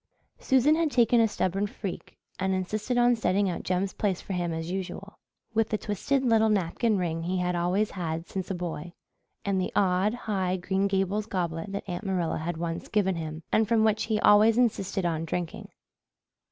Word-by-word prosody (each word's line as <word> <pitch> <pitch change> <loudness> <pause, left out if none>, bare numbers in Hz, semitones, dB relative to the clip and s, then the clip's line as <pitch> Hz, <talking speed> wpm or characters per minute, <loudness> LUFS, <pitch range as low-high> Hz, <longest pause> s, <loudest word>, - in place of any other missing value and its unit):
Susan 265 +3 +4
had 325 -1 +1
taken 240 -3 +4
a 225 - +4
stubborn 195 -1 -1
freak 195 -2 -7 0.2
and 190 0 +1
insisted 215 +6 -2
on 245 0 +5
setting 200 -3 +1
out 180 - -2
Jem's 185 +1 -1
place 195 -4 -1
for 195 - -6
him 175 -2 -1
as 165 +1 -4
usual, 190 +2 -6 0.3
with 225 -1 +1
the 215 - 0
twisted 260 +7 -1
little 220 -2 +4
napkin 210 +3 +1
ring 165 -3 -1
he 180 +3 -1
had 180 0 0
always 180 +5 +1
had 165 -2 -4
since 190 -2 -5
a 190 - -1
boy, 175 -1 -5 0.5
and 195 -2 +1
the 185 - -2
odd, 195 +3 +2
high 190 -6 -1
Green 190 +2 0
Gables 195 +2 0
goblet 170 -2 -3
that 200 - -5
Aunt 175 +2 -4
Marilla 185 -5 -1
had 165 +1 -3
once 165 0 -4
given 195 -3 +1
him 160 -1 -5
and 220 0 +3
from 225 0 +3
which 215 0 +2
he 220 -1 0
always 215 +2 +6
insisted 200 -6 +1
on 165 -2 0
drinking. 165 +1 -4
190 Hz, 190 wpm, -27 LUFS, 175-215 Hz, 0.5 s, always